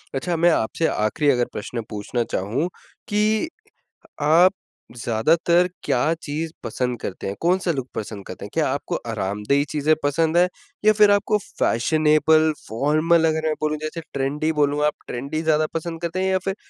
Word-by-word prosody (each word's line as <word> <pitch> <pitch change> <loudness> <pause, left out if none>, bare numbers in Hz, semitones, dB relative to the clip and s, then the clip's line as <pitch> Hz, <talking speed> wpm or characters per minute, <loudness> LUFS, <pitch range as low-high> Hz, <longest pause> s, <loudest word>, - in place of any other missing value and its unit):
अच्छा 170 +6 -1
मैं 170 +1 +4
आपसे 160 +4 0
आखिरी 125 +8 0
अगर 125 -2 +1
प्रश्न 115 +3 -4
पूछना 105 +3 -2
चाहूँ, 115 - -2 0.4
कि 215 +5 +1 0.7
आप 165 +6 +5 0.4
ज़्यादातर 165 +10 +2 0.2
क्या 125 - +1 0.2
चीज़ 155 +3 -3
पसंद 125 -2 -2
करते 95 - -5
हैं? 100 +1 -3
कौन-सा 180 +1 +1
लुक 135 -4 -4
पसंद 105 -2 -6
करते 95 - -8
हैं? 100 - -8
क्या 160 -2 +2
आपको 140 +2 -2 0.2
आरामदेही 105 +7 0
चीज़ें 150 +1 +2
पसंद 160 +3 +1
हैं? 180 +1 +5 0.4
या 215 - +7
फिर 210 -1 +5
आपको 205 +1 +2 0.2
फैशनेबल, 155 +4 +3 0.2
फॉर्मल 155 +7 +2
अगर 160 0 -1
मैं 155 - +1
बोलूँ 155 0 -1
जैसे 155 +2 -4
ट्रेंडी 145 +3 0
बोलूँ 145 +1 +2
आप 150 - +1
ट्रेंडी 140 +6 -4
ज़्यादा 155 -1 +2
पसंद 165 0 -4
करते 170 +2 -2
हैं 190 - +1
या 190 - +3
फिर 195 - -1
155 Hz, 165 wpm, -22 LUFS, 125-170 Hz, 0.7 s, या